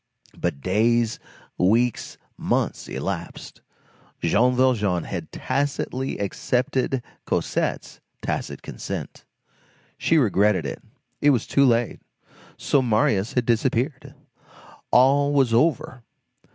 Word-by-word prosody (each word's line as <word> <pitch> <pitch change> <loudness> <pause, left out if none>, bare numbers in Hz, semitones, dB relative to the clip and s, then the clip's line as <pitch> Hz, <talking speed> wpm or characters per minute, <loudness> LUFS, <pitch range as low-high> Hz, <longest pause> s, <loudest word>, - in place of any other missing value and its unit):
But 70 - -3
days, 115 - +1 0.4
weeks, 115 +6 +1 0.2
months, - - -1
elapsed. - - -5 0.6
Jean 120 +10 +2
Valjean 105 -9 +2
had - - -6
tacitly 135 -1 -2
accepted 125 +5 -1 0.2
Cosette's - - -2 0.2
tacit - - -4
consent. - - -7 0.7
She 165 - +3
regretted 105 - +2
it. 70 - -5 0.4
It 145 - +5
was 125 -6 +2
too 140 - +3
late. 120 -1 +1 0.6
So 140 - +2
Marius 110 -3 +1
had 125 -2 +1
disappeared; 125 +4 -1 0.7
all 140 +3 +4
was 135 -5 +3
over. 130 -1 +1
120 Hz, 100 wpm, -23 LUFS, 105-130 Hz, 0.7 s, It